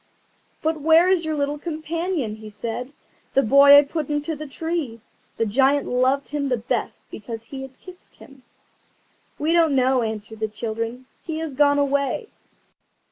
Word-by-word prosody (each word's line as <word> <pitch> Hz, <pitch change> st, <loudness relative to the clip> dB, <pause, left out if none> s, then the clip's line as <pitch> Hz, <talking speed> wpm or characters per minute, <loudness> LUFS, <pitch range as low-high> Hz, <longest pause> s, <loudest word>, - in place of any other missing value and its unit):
"But 315 Hz, -1 st, -1 dB
where 325 Hz, +3 st, +5 dB
is 360 Hz, -3 st, +2 dB
your 315 Hz, -1 st, -1 dB
little 290 Hz, 0 st, -2 dB
companion?" 320 Hz, -, -3 dB
he 215 Hz, 0 st, -10 dB
said: 230 Hz, +5 st, -5 dB, 0.4 s
"the 275 Hz, -, +5 dB
boy 280 Hz, +4 st, +8 dB
I 290 Hz, -, +7 dB
put 300 Hz, +1 st, -4 dB
into 295 Hz, +2 st, -2 dB
the 305 Hz, +1 st, -7 dB
tree." 315 Hz, -5 st, -4 dB, 0.4 s
The 225 Hz, -, +1 dB
Giant 270 Hz, +6 st, +2 dB
loved 260 Hz, +3 st, +1 dB
him 285 Hz, -1 st, -2 dB
the 250 Hz, -, +1 dB
best 225 Hz, -, -3 dB
because 225 Hz, +1 st, -7 dB
he 265 Hz, +3 st, -8 dB
had 265 Hz, 0 st, -11 dB
kissed 365 Hz, -1 st, -14 dB
him. 275 Hz, -2 st, -16 dB, 1.0 s
"We 310 Hz, +3 st, 0 dB
don't 325 Hz, -4 st, +3 dB
know," 260 Hz, 0 st, +3 dB
answered 220 Hz, -1 st, -5 dB
the 220 Hz, -, -1 dB
children; 230 Hz, +3 st, -5 dB, 0.2 s
"he 320 Hz, -1 st, -5 dB
has 320 Hz, -3 st, -4 dB
gone 285 Hz, +1 st, +3 dB
away." 280 Hz, -, 0 dB
280 Hz, 165 wpm, -23 LUFS, 240-310 Hz, 1.0 s, boy